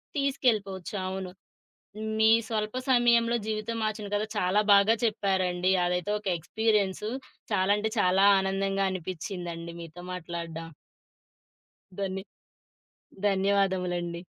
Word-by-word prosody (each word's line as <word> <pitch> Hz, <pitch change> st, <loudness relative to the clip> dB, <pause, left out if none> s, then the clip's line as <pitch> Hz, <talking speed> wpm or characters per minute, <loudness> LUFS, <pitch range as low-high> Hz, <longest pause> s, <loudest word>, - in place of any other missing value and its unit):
తీసుకెళ్ళిపోవచ్చు. 215 Hz, -, 0 dB
అవును. 190 Hz, -1 st, -4 dB, 0.9 s
మీ 220 Hz, 0 st, +5 dB, 0.2 s
స్వల్ప 215 Hz, 0 st, -2 dB
సమయంలో 235 Hz, -2 st, +4 dB
జీవితం 220 Hz, +1 st, -2 dB
మార్చిన 215 Hz, -1 st, -2 dB
గథ 205 Hz, -, 0 dB
చాలా 185 Hz, +2 st, +2 dB
బాగా 200 Hz, +3 st, +5 dB
చెప్పారండి. 190 Hz, -4 st, +1 dB
అదైతే 180 Hz, +3 st, -1 dB
ఒక 210 Hz, -, -8 dB
ఎక్స్‌పీరియన్సు. 210 Hz, +2 st, 0 dB, 0.4 s
చాలాంటే 205 Hz, +3 st, +2 dB
చాలా 185 Hz, +2 st, +4 dB
ఆనందంగా 195 Hz, 0 st, 0 dB
అనిపిచిందండి 175 Hz, -1 st, -5 dB
మీతో 170 Hz, +1 st, -10 dB
మాట్లాడ్డం. 165 Hz, -2 st, -6 dB, 1.3 s
ధన్ని 190 Hz, 0 st, -3 dB, 1.1 s
ధన్యవాదములండి. 185 Hz, -3 st, 0 dB
195 Hz, 90 wpm, -28 LUFS, 180-215 Hz, 1.3 s, మీ